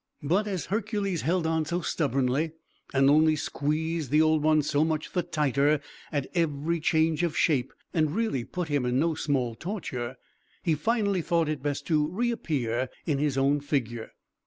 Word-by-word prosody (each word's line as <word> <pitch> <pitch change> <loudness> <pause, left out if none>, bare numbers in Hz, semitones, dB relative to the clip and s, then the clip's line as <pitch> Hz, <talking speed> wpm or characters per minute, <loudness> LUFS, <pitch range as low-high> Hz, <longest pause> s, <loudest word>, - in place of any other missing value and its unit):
But, 185 +9 +1
as 185 -7 -2
Hercules 200 -3 -1
held 170 +1 +1
on 160 0 +1
so 170 +3 -2
stubbornly, 140 0 0 0.4
and 135 0 +4
only 155 +2 +5
squeezed 155 +1 -2
the 150 +3 +4
Old 155 -1 +4
One 155 0 +3
so 145 +1 +2
much 155 -1 -2
the 180 - +2
tighter 150 -3 +1 0.3
at 145 -3 -1
every 165 0 0
change 160 +1 +2
of 170 -3 -1
shape, 135 -6 +2 0.2
and 155 -1 +1
really 220 - 0
put 180 +7 -4
him 145 -2 +1
to 125 0 -1
no 155 +6 +2
small 135 -6 -1
torture, 130 - -4 0.5
he 165 - +2
finally 200 +3 +1
thought 165 -1 +1
it 150 -3 -2
best 145 0 -2
to 150 -3 +2
reappear 155 - -1 0.2
in 145 -4 0
his 145 -2 0
own 140 +2 +3
figure. 120 -6 -2
155 Hz, 170 wpm, -27 LUFS, 140-170 Hz, 0.5 s, only